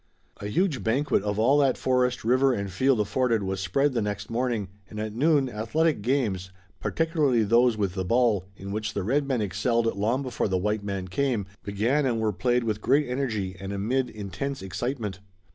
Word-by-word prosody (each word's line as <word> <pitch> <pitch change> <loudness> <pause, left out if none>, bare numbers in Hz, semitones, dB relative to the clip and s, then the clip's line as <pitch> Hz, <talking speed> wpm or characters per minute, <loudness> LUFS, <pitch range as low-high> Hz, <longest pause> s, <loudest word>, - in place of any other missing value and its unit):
A 100 - -6
huge 160 - 0
banquet 130 +2 +1
of 105 0 -2
all 130 +7 +4
that 135 -3 +3
forest, 125 -1 +1
river 130 +3 +3
and 100 -4 -3
field 130 +6 +2
afforded 115 +1 +1
was 95 0 -2
spread 130 +10 +1
the 120 - 0
next 105 0 -4
morning, 115 -4 -1 0.2
and 105 - -7
at 110 0 -3
noon 145 +2 +3
athletic 125 +6 0
games, 105 -7 0 0.3
particularly 155 -8 +1
those 115 +2 +4
with 100 -4 -1
the 95 -1 -2
ball, 110 -2 +2
in 100 +1 -7
which 110 +1 -3
the 100 - -1
red 140 +7 +1
man 130 -5 0
excelled 115 +4 0
long 115 +7 0
before 130 -4 -1
the 95 -2 0
white 105 +2 -1
man 100 -2 -3
came, 115 +1 0 0.2
began 115 +8 +1
and 115 -3 0
were 110 -1 0
played 120 +4 +1
with 110 -2 -2
great 140 +4 +3
energy 115 -8 -2
and 95 0 -5
amid 120 +6 0
intense 105 +6 -5
excitement. 105 - -3
115 Hz, 190 wpm, -26 LUFS, 100-130 Hz, 0.3 s, all